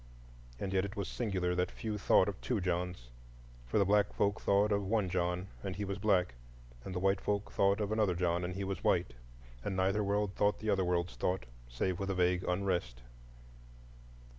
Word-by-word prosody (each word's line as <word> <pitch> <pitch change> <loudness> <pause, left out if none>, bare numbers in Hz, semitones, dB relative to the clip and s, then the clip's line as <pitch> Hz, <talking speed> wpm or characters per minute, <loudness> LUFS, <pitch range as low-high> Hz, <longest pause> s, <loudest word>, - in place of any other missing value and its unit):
And 95 -1 -3
yet 95 -1 +2
it 100 +1 -5
was 100 -3 -3
singular 95 -6 -1
that 90 0 0
few 105 -2 -4
thought 95 - +4
of 100 -2 -4
two 120 -4 0
Johns,—for - - -5
the 100 - +4
black 105 +1 +3
folk 100 +1 0
thought 100 +2 +3
of 100 0 +1
one 100 -1 +1
John, 90 +1 -1
and 95 -2 -4
he 100 +2 -3
was 100 0 -4
black; 95 -5 +2 0.5
and 95 - -6
the - - 0
white 95 +1 +2
folk 100 0 -1
thought 100 +1 +3
of 105 -1 -1
another 105 -5 +2
John, 85 0 0
and 90 +1 -3
he 100 - -3
was 95 0 -4
white. - - +2 0.5
And 95 - -2
neither 95 +3 +2
world 100 0 0
thought 105 +1 +2
the 110 -1 -1
other 95 -1 +2
world's 90 -1 0
thought, 90 -6 -1 0.2
save 90 +10 -1
with 100 0 -2
a 95 - 0
vague 90 0 +2
unrest. 90 -11 -1
95 Hz, 195 wpm, -33 LUFS, 90-100 Hz, 0.5 s, thought